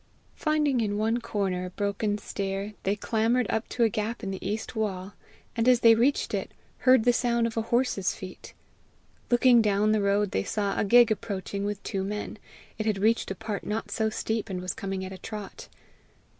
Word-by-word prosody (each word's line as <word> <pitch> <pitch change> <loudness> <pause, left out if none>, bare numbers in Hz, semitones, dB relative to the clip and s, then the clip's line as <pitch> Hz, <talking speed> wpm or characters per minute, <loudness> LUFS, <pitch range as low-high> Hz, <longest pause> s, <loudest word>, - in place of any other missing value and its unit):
Finding 300 -5 +1
in 205 -2 -1
one 225 +3 +1
corner 190 -4 -2
a - - -5
broken 205 +2 -1
stair, 200 0 -4
they 195 +2 0
clambered 230 +3 +1
up 220 - -2
to 240 - 0
a 225 - +4
gap 215 +3 -3
in 195 - -3
the 190 - -6
east 210 +5 -3
wall; 200 -3 -3 0.4
and 230 0 +1
as 250 -1 +5
they 230 -1 +8
reached 245 +5 +1
it, - - -2 0.3
heard 255 -3 +5
the 245 - +4
sound 235 -1 +1
of 230 - -3
a 225 - +1
horse's 230 -4 0
feet. 185 -1 -10 0.7
Looking 240 -1 +6
down 210 0 +2
the 215 -1 +2
road, 200 0 +1
they 95 - 0
saw 200 - -1
a - - +2
gig 240 +2 +6
approaching 200 -1 -3
with 205 -1 -4
two 190 -1 -2
men. 210 +1 -5 0.4
It 215 - -1
had 210 -2 +1
reached 220 +4 +2
a 195 - -3
part 215 0 -5
not 215 +2 -3
so 220 -1 0
steep, 220 0 -2
and 185 -2 -3
was 185 0 -3
coming 195 -1 -4
at 190 - -7
a 190 - -10
trot. 210 -2 -8
215 Hz, 200 wpm, -27 LUFS, 200-230 Hz, 0.7 s, they